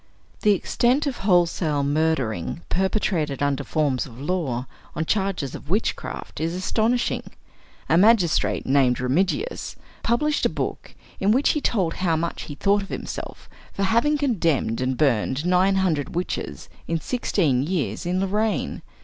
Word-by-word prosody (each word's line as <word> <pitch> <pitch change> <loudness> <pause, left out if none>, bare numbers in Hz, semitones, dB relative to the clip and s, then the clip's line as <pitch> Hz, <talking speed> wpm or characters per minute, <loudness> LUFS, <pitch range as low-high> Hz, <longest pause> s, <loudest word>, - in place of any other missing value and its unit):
The 210 - +5
extent 245 - +1
of 275 -4 -2
wholesale 170 -6 +2
murdering 145 - 0
perpetrated 180 -7 0
under 145 0 0
forms 145 -1 0
of 120 -1 -13
law, 140 -6 -2 0.3
on 160 - -1
charges 190 - -1
of - - -9
witchcraft, 205 +6 -2
is 165 +2 -1
astonishing. 225 +6 0 0.7
A 165 - +4
magistrate 200 -5 +3
named 130 -2 +3
Remigius, 185 - -1 0.3
published 290 +6 +1
a - - +4
book - - -5 0.2
in 195 +2 +3
which 260 +6 +3
he 300 - +1
told 185 -11 +1
how 170 -3 +2
much 165 +1 -3
he 145 - -7
thought 200 +5 +2
of 195 - -8
himself - - -6 0.3
for 200 - -2
having 235 +10 +3
condemned 170 - 0
and 130 0 0
burned 135 +1 +1
nine 185 +2 +3
hundred 170 -6 0
witches 180 +1 -3 0.2
in 165 0 0
sixteen 160 - +1
years, 145 - -2
in 180 +2 0
Lorraine. 210 +3 -1
175 Hz, 145 wpm, -24 LUFS, 145-205 Hz, 0.7 s, The